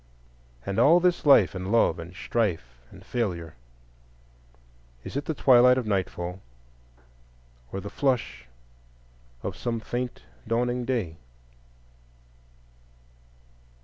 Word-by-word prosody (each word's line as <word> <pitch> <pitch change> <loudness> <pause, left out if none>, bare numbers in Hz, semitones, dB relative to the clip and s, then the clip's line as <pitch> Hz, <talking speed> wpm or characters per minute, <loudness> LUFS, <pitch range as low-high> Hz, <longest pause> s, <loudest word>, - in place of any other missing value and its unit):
And 100 - -2
all 170 +4 +6
this 175 -3 +1
life 140 - +6
and 95 +1 -5
love 115 -6 +3
and 85 +2 -9
strife 80 - -2
and - - -15
failure,—is - - -9
it 140 +1 -2
the 160 - -3
twilight 125 -1 +6
of 125 - -1
nightfall 95 -2 -3 1.3
or 95 - -4
the 100 - -7
flush 125 - -1 1.0
of - - -4
some 115 -2 -3
faint 120 - -5 0.2
dawning 120 +1 0
day? 110 -11 -2
95 Hz, 100 wpm, -26 LUFS, -, 1.3 s, all